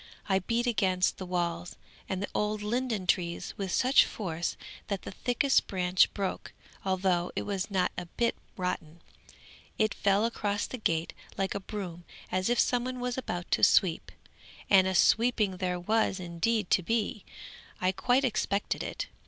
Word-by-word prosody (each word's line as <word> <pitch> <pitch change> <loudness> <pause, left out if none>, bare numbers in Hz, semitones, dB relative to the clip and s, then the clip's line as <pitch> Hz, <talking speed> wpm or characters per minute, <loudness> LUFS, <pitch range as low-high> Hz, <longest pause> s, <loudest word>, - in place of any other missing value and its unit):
I 190 -2 +3
beat 230 +6 -1
against 190 -6 +1
the 185 - -5
walls 175 -1 -2 0.3
and 190 0 -2
the - - -3
old 210 0 -1
linden 230 -2 -1
trees 170 -1 0
with 195 -2 -4
such 260 +2 +5
force 170 -5 -3 0.3
that 200 -2 -3
the - - -6
thickest 250 +7 +1
branch 185 -1 +3
broke, 195 -2 -3 0.3
although 185 -2 +1
it - - -1
was 195 -1 -3
not 190 -3 +1
a 175 - -7
bit 235 +7 0 0.2
rotten. 170 -3 -4 0.8
It 215 -1 +2
fell 200 +2 +2
across 205 -3 -1
the 255 - -6
gate 165 -5 0 0.2
like 195 0 0
a 200 - -2
broom, 190 -4 -6 0.3
as 185 +2 0
if 240 - +2
some 245 -1 +2
one 255 0 -4
was 245 0 -2
about 180 -9 -4
to - - +1
sweep; 175 -4 +4 0.6
and 190 -2 +7
a 190 - -1
sweeping 215 -3 +3
there 180 -1 -1
was 215 +1 +1
indeed 180 +4 -1
to - - +5
be. 215 +1 -1 0.6
I 185 0 +2
quite 250 +7 +2
expected 205 -4 -1
it. - - -4
195 Hz, 165 wpm, -29 LUFS, 180-225 Hz, 0.8 s, and